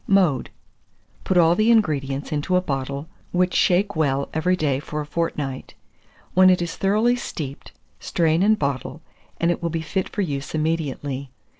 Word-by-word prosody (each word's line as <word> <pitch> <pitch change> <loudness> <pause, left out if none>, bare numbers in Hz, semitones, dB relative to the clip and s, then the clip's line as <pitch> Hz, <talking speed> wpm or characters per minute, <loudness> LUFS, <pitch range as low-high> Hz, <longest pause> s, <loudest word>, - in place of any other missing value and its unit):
Mode. 180 -10 +3 0.8
Put 190 - +1
all 170 -1 +6
the 215 +5 +2
ingredients 145 -11 +1
into 150 +5 0
a - - +5
bottle, 140 -1 -3 0.2
which 180 0 +1
shake 195 +1 +2
well 140 -3 0
every 180 +4 +2
day 145 -6 0
for 150 +1 -5
a 150 - -3
fortnight. 145 -4 -3 0.6
When 185 0 +6
it 185 - +4
is 170 -1 -3
thoroughly 215 +5 +2
steeped, 145 - -6 0.3
strain 165 0 +1
and 215 +2 +4
bottle, 140 +1 -3 0.4
and 170 +1 +2
it - - -3
will 170 - -1
be 165 0 -3
fit 190 +4 -2
for 205 - -1
use 140 -3 -4
immediately. 145 -4 -2
160 Hz, 165 wpm, -23 LUFS, 140-185 Hz, 0.8 s, all